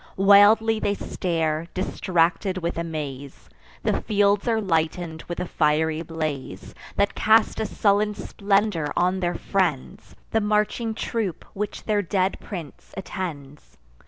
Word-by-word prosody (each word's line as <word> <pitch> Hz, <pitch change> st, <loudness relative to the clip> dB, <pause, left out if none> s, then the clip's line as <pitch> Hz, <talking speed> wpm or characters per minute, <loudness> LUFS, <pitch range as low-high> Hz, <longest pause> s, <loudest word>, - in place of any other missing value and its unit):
Wildly 205 Hz, +3 st, +6 dB
they 205 Hz, -1 st, 0 dB
stare, 165 Hz, -4 st, -2 dB
distracted 185 Hz, 0 st, 0 dB
with 170 Hz, -1 st, -2 dB
amaze: 145 Hz, -, -6 dB, 0.3 s
The -, -, 0 dB
fields 205 Hz, 0 st, +2 dB
are 225 Hz, -2 st, +2 dB
lighten'd 165 Hz, -3 st, -1 dB
with 175 Hz, -, -5 dB
a -, -, -1 dB
fiery 155 Hz, 0 st, +1 dB
blaze, 155 Hz, -, -5 dB, 0.2 s
That 200 Hz, -, +1 dB
cast 220 Hz, +1 st, +3 dB
a 220 Hz, -, -1 dB
sullen 210 Hz, 0 st, +1 dB
splendour 200 Hz, -7 st, 0 dB
on 185 Hz, +2 st, +2 dB
their 175 Hz, -1 st, -1 dB
friends, 175 Hz, -9 st, -2 dB, 0.2 s
The 220 Hz, -, +2 dB
marching 215 Hz, +2 st, 0 dB
troop 215 Hz, -6 st, -3 dB
which 205 Hz, +1 st, -4 dB
their 210 Hz, -2 st, +1 dB
dead 190 Hz, 0 st, 0 dB
prince 170 Hz, -8 st, -9 dB
attends. 150 Hz, -7 st, -7 dB
185 Hz, 130 wpm, -24 LUFS, 160-205 Hz, 0.3 s, Wildly